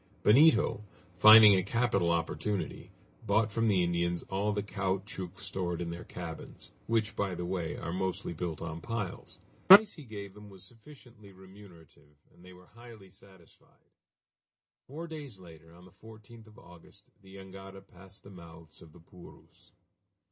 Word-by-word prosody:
Benito, 130 Hz, -2 st, +4 dB, 0.4 s
finding 110 Hz, 0 st, +9 dB
a 95 Hz, -, +2 dB
capital 105 Hz, -4 st, 0 dB
opportunity, 85 Hz, +2 st, -3 dB, 0.4 s
bought 110 Hz, 0 st, +1 dB
from 115 Hz, +2 st, 0 dB
the 95 Hz, -4 st, +2 dB
Indians 85 Hz, 0 st, -1 dB
all 100 Hz, +2 st, -1 dB
the 105 Hz, -1 st, -3 dB
caoutchouc 95 Hz, -2 st, -5 dB
stored 90 Hz, -3 st, -4 dB
in 85 Hz, -1 st, -4 dB
their 85 Hz, +1 st, -8 dB
cabins, 80 Hz, -2 st, -10 dB, 0.2 s
which, 110 Hz, -2 st, -1 dB
by 95 Hz, -3 st, -2 dB
the 90 Hz, 0 st, -5 dB
way, 85 Hz, -2 st, -4 dB
are 85 Hz, -, -6 dB
mostly 95 Hz, -2 st, -3 dB
built 85 Hz, -1 st, -5 dB
on 80 Hz, 0 st, -7 dB
piles. 105 Hz, -4 st, -6 dB, 0.3 s
The 190 Hz, -, +13 dB
price 210 Hz, 0 st, -9 dB
he 155 Hz, -, -12 dB
gave 100 Hz, -4 st, -9 dB
them 105 Hz, 0 st, -14 dB
was 95 Hz, -2 st, -15 dB
sufficiently 115 Hz, -1 st, -17 dB
remunerative, 95 Hz, -6 st, -18 dB, 0.2 s
and 85 Hz, -, -21 dB
they 90 Hz, -, -14 dB
were 90 Hz, 0 st, -17 dB
highly 110 Hz, -3 st, -16 dB
satisfied. 95 Hz, -3 st, -23 dB, 1.0 s
Four 155 Hz, +5 st, -8 dB
days 150 Hz, -9 st, -9 dB
later, 80 Hz, -3 st, -16 dB
on 90 Hz, +1 st, -17 dB
the 90 Hz, -, -18 dB
14th 110 Hz, +2 st, -16 dB
of 105 Hz, -, -18 dB
August, 90 Hz, -1 st, -18 dB
the 95 Hz, 0 st, -16 dB
jangada 95 Hz, 0 st, -12 dB
passed 95 Hz, +3 st, -18 dB
the 100 Hz, -, -14 dB
mouths 85 Hz, -3 st, -15 dB
of 80 Hz, -2 st, -16 dB
the -, -, -17 dB
Purus. 90 Hz, +1 st, -18 dB
95 Hz, 160 wpm, -30 LUFS, 85-105 Hz, 1.0 s, The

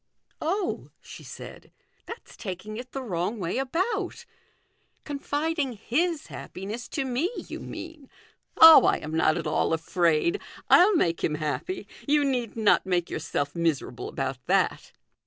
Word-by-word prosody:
" -, -, -38 dB
Oh! 365 Hz, +4 st, -2 dB
" -, -, -46 dB
she -, -, -12 dB
said, -, -, -10 dB, 0.2 s
" -, -, -40 dB
that's 460 Hz, -, -10 dB
taking 200 Hz, +1 st, -6 dB
it 250 Hz, +1 st, -8 dB
the 270 Hz, -, -5 dB
wrong 185 Hz, 0 st, -2 dB
way 185 Hz, +5 st, -2 dB
about 375 Hz, -, -2 dB, 0.8 s
confiding 290 Hz, -1 st, -2 dB
his 295 Hz, -, -1 dB
happiness 210 Hz, +6 st, -7 dB
to 275 Hz, -, -3 dB
me, 260 Hz, +7 st, 0 dB
you -, -, -7 dB
mean. 320 Hz, -5 st, -9 dB, 0.5 s
Oh, 320 Hz, 0 st, +10 dB
I -, -, +3 dB
am 150 Hz, -, -7 dB
not 160 Hz, 0 st, +2 dB
at 165 Hz, -, -4 dB
all 155 Hz, +1 st, +1 dB
afraid; 170 Hz, -, +1 dB, 0.3 s
I'll 385 Hz, +3 st, +7 dB
make 170 Hz, -, +1 dB
him 150 Hz, -, +1 dB
happy. 155 Hz, -, -3 dB, 0.2 s
You 295 Hz, 0 st, +3 dB
need 245 Hz, -5 st, -1 dB
not 220 Hz, -2 st, +4 dB
make 180 Hz, -2 st, -1 dB
yourself 145 Hz, +2 st, -3 dB
miserable 165 Hz, -7 st, -1 dB
about 130 Hz, -2 st, -4 dB
that." -, -, +1 dB
245 Hz, 155 wpm, -26 LUFS, -, 0.8 s, Oh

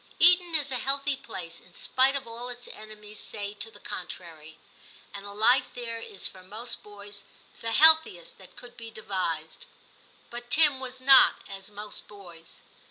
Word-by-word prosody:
Eton 350 Hz, -1 st, +6 dB
is 290 Hz, -3 st, +1 dB
a 255 Hz, -, -1 dB
healthy 275 Hz, +2 st, 0 dB
place, 180 Hz, -10 st, -8 dB
in 180 Hz, -, -21 dB
spite 265 Hz, +2 st, +3 dB
of 275 Hz, -2 st, -4 dB
all 235 Hz, +2 st, -7 dB
its 245 Hz, 0 st, -6 dB
enemies 215 Hz, -1 st, -10 dB
say 205 Hz, -1 st, -6 dB
to 210 Hz, +2 st, -4 dB
the -, -, -16 dB
contrary, 160 Hz, -4 st, -8 dB, 0.6 s
and 200 Hz, -1 st, -7 dB
the -, -, -7 dB
life 240 Hz, +5 st, +3 dB
there 230 Hz, -2 st, -4 dB
is 205 Hz, -3 st, -4 dB
for 185 Hz, -, -13 dB
most 215 Hz, +6 st, -6 dB
boys 205 Hz, -1 st, -11 dB, 0.4 s
the 230 Hz, -, -3 dB
healthiest 320 Hz, -, +5 dB
that -, -, -16 dB
could 245 Hz, -1 st, -11 dB
be 230 Hz, -1 st, -7 dB
devised. 190 Hz, -, -4 dB, 0.6 s
But 240 Hz, 0 st, -8 dB
Tim 295 Hz, -1 st, +4 dB
was 260 Hz, 0 st, -7 dB
not 265 Hz, 0 st, +6 dB
as 195 Hz, 0 st, -9 dB
most 210 Hz, 0 st, -9 dB
boys. 175 Hz, -5 st, -13 dB
225 Hz, 165 wpm, -27 LUFS, 200-260 Hz, 0.6 s, Eton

